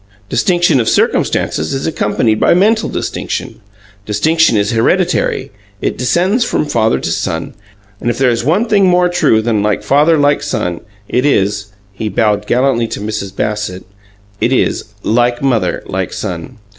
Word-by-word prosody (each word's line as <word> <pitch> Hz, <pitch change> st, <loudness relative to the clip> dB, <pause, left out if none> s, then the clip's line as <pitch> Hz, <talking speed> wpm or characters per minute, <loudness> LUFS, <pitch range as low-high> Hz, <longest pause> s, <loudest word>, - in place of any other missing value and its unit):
Distinction 175 Hz, -6 st, +2 dB
of 115 Hz, -, +1 dB
circumstances 80 Hz, -, 0 dB
is 135 Hz, -, -3 dB
accompanied 110 Hz, -6 st, 0 dB
by -, -, +4 dB
mental 215 Hz, +4 st, +2 dB
distinction. -, -, -4 dB, 0.4 s
Distinction 155 Hz, +6 st, +2 dB
is 100 Hz, 0 st, +1 dB
hereditary; 115 Hz, -1 st, +1 dB, 0.3 s
it -, -, -2 dB
descends 180 Hz, -, +1 dB
from 155 Hz, -, -1 dB
father 115 Hz, -6 st, +1 dB
to -, -, -3 dB
son, 80 Hz, 0 st, -3 dB, 0.5 s
and 120 Hz, -, -2 dB
if 120 Hz, -, -1 dB
there 130 Hz, -2 st, +3 dB
is 115 Hz, 0 st, -1 dB
one 175 Hz, -, +2 dB
thing 200 Hz, -3 st, +3 dB
more 180 Hz, 0 st, +3 dB
true 110 Hz, -10 st, +2 dB
than 110 Hz, -2 st, +1 dB
'Like 105 Hz, 0 st, 0 dB
father, 150 Hz, +4 st, +3 dB
like 145 Hz, 0 st, +2 dB
son,' 85 Hz, -1 st, -3 dB, 0.3 s
it 125 Hz, -, 0 dB
is 105 Hz, -7 st, +1 dB
" 95 Hz, 0 st, -34 dB
he 110 Hz, -, -1 dB
bowed 105 Hz, 0 st, 0 dB
gallantly 125 Hz, -2 st, +1 dB
to -, -, -5 dB
Mrs. 100 Hz, -2 st, -5 dB
Bassett 105 Hz, -4 st, -3 dB, 0.5 s
"it 120 Hz, -, +1 dB
is, 130 Hz, -, +1 dB, 0.2 s
'Like 120 Hz, +3 st, +1 dB
mother, 115 Hz, -9 st, 0 dB
like -, -, -3 dB
son.' 90 Hz, +8 st, -5 dB
120 Hz, 160 wpm, -14 LUFS, 105-155 Hz, 0.5 s, by